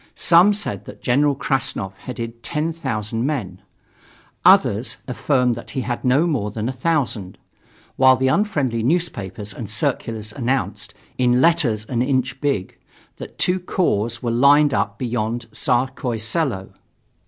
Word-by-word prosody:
Some 180 +4 +5
said 205 0 -4
that - - -12
General 140 +3 +2
Krassnov 130 -8 -1
headed 115 0 -7
ten 155 +7 -2
thousand 115 -7 -3
men; 145 -1 -3 0.8
others 130 - +4
affirmed 125 -1 +1
that 115 - -8
he 135 - -3
had 120 -1 -4
no 130 +6 +3
more 130 -12 -1
than 110 +2 -4
a - - -1
thousand; 125 - -1 0.6
while 130 0 +6
the 130 +1 0
unfriendly 135 - +1
newspapers 110 - -2
and 105 -1 -7
circulars 115 -4 -2
announced, 115 -6 -2 0.2
in 125 0 +3
letters 135 -9 +2
an 120 +1 -1
inch 130 0 -1
big, 140 -11 -2 0.4
that - - -10
two 180 +1 +1
corps 120 - -1
were 120 - 0
lined 140 +4 +5
up - - -1
beyond 120 -2 -2
Tsarskoye 125 +1 -1
Selo. 115 - -2
125 Hz, 140 wpm, -21 LUFS, 115-145 Hz, 0.8 s, while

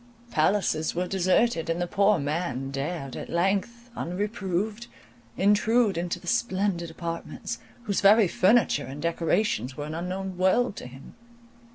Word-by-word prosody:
Palaces 160 -1 +1
were 180 +1 0
deserted, 185 0 +1
and 165 +1 0
the 175 - 0
poor 200 +2 +3
man 140 -3 -2
dared 140 0 -4
at - - -7
length, 205 +7 -1
unreproved, 205 +3 -3 0.5
intrude 210 +2 +3
into 175 +1 -2
the 175 - -15
splendid 190 -5 0
apartments, 165 0 -5 0.2
whose 205 -5 -1
very 205 +1 +6
furniture 185 - +3
and 135 +2 -7
decorations 165 - 0
were 145 - -4
an 155 - -6
unknown 185 +2 -4
world 200 +4 +2
to - - -7
him. 130 +2 -13
180 Hz, 140 wpm, -26 LUFS, 165-205 Hz, 0.5 s, very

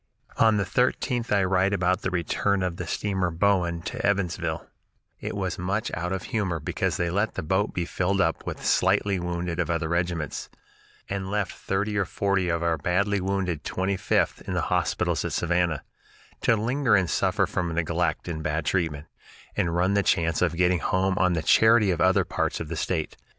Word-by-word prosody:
On 110 -1 +4
the 100 - +1
13th 125 +3 0
I 100 -1 +3
write 95 +1 +2
about 95 0 +1
the - - -1
return 95 +2 0
of 90 -2 -2
the 90 - -5
steamer 95 -1 -1
Bowen 85 -1 +1
to - - -5
Evansville: 90 -5 -1 0.6
"I - - -3
was 95 -1 -3
much 100 +6 -1
out 90 +2 -2
of 95 -1 -2
humor 95 -7 -1
because 75 - -1
they 85 -1 0
let 100 +4 0
the - - -3
boat 95 +6 +1
be 85 - -2
filled 95 +3 -1
up 80 -3 +1
with - - -5
slightly 100 -2 +2
wounded 85 0 -3
of 85 - 0
other 85 -1 0
regiments, 85 -3 -2 0.6
and 95 -1 -3
left 100 -2 -1
thirty 105 +2 -2
or 100 - +1
forty 95 0 0
of 85 0 0
our 85 -2 +1
badly 100 +5 +1
wounded 90 -4 -1
Twenty 95 +1 -1
fifth 95 - 0
in - - -2
the - - +1
hospitals - - 0
at - - -3
Savannah, 85 -3 0 0.6
to 115 - +4
linger 120 +2 +2
and 95 -2 +2
suffer - - +1
from 85 -2 -2
neglect 85 0 -1
and 80 -2 -4
bad 80 0 -2
treatment, 80 -5 -1 0.5
and 85 -1 0
run 90 +3 +2
the 100 - +3
chance 85 -4 +1
of 85 -2 +1
getting 90 0 +3
home 95 +3 +1
on 90 -1 +3
the 80 -2 -1
charity 110 0 +5
of 85 - -1
other - - +4
parts - - -1
of 80 - -5
the 85 - -3
State. 80 0 -2
90 Hz, 190 wpm, -26 LUFS, 85-100 Hz, 0.6 s, charity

